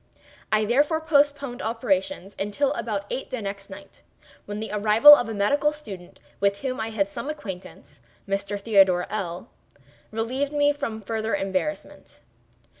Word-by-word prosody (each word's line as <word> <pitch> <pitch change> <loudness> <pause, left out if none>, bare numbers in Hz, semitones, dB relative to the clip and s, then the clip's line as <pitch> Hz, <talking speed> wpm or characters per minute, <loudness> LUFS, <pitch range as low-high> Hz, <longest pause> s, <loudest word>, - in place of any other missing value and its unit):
I 215 0 +3
therefore 290 +8 +2
postponed 285 -4 +1
operations 235 -2 -2
until 205 +8 0
about 205 -3 -3
eight 265 - -4
the 255 - -4
next 200 -1 -6
night, - - -13 0.5
when 205 0 -5
the 220 - -5
arrival 215 +7 +8
of 245 -5 +3
a - - -3
medical 285 +9 +2
student 200 -13 -10 0.2
with 200 0 +1
whom 260 -1 -3
I 220 0 -2
had 210 -3 0
some 200 +8 -6
acquaintance, 190 - -9 0.3
(Mr. 200 +1 -2
Theodore 195 -4 +4
L—l,) 185 0 -5 0.6
relieved 255 +6 -2
me 290 0 +3
from 230 -7 -5
farther 220 +1 -2
embarrassment. 195 +11 -4
220 Hz, 145 wpm, -25 LUFS, 200-280 Hz, 0.6 s, arrival